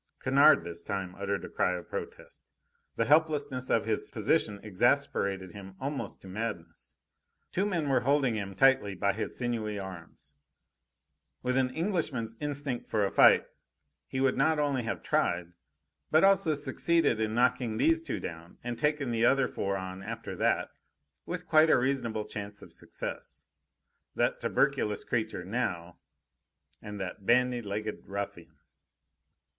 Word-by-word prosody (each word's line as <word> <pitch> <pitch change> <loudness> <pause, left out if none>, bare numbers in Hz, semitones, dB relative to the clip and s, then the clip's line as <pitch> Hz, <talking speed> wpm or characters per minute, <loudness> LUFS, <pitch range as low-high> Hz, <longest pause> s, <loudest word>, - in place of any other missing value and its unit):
Kennard 140 +3 +5
this 85 0 -6
time 95 -3 -4
uttered 100 +1 -3
a - - -6
cry 90 - +1
of 90 - -10
protest. - - -7 0.5
The 115 - +1
helplessness 145 -3 +2
of 115 - +2
his 110 -1 -1
position 100 -1 +1
exasperated 100 -4 +1
him 95 -1 -10
almost 140 +1 -4
to - - -12
madness. 105 -3 -6 0.6
Two 195 +3 0
men 170 -7 -1
were 135 -2 +3
holding 135 -2 +2
him 100 -3 -4
tightly 130 -4 +4
by 100 +2 +1
his 110 - -4
sinewy 115 -4 -2
arms. 85 -7 -9 1.1
With 125 0 0
an 130 -1 +2
Englishman's 150 - -2
instinct 145 -4 -3
for 105 -2 +1
a 95 - -2
fight, - - +6 0.6
he 130 - -3
would 135 -1 +2
not 155 +4 +3
only 145 -3 +1
have 120 0 -4
tried, 85 0 0 0.6
but 155 +3 +4
also 195 -5 +4
succeeded 155 -3 +1
in 110 0 -1
knocking 125 -2 +1
these 160 +6 +3
two 160 -4 -4
down, 85 0 -8
and 120 -1 -4
taken 150 -3 0
the 115 0 +2
other 135 +1 +4
four 100 0 -2
on 95 0 -6
after 115 +3 -6
that, - - +1 0.6
with - - -4
quite 155 +1 +5
a - - +6
reasonable 125 -5 -1
chance 100 0 -7
of - - -14
success. 75 - -7 0.7
That - - 0
tuberculous 105 -1 +1
creature, 110 -6 -2
now! 90 -6 -3 0.8
And 105 -1 -7
that 95 +1 -5
bandy 125 +2 +3
legged 105 0 -5
ruffian! 100 -3 -6
115 Hz, 150 wpm, -30 LUFS, 100-135 Hz, 1.1 s, fight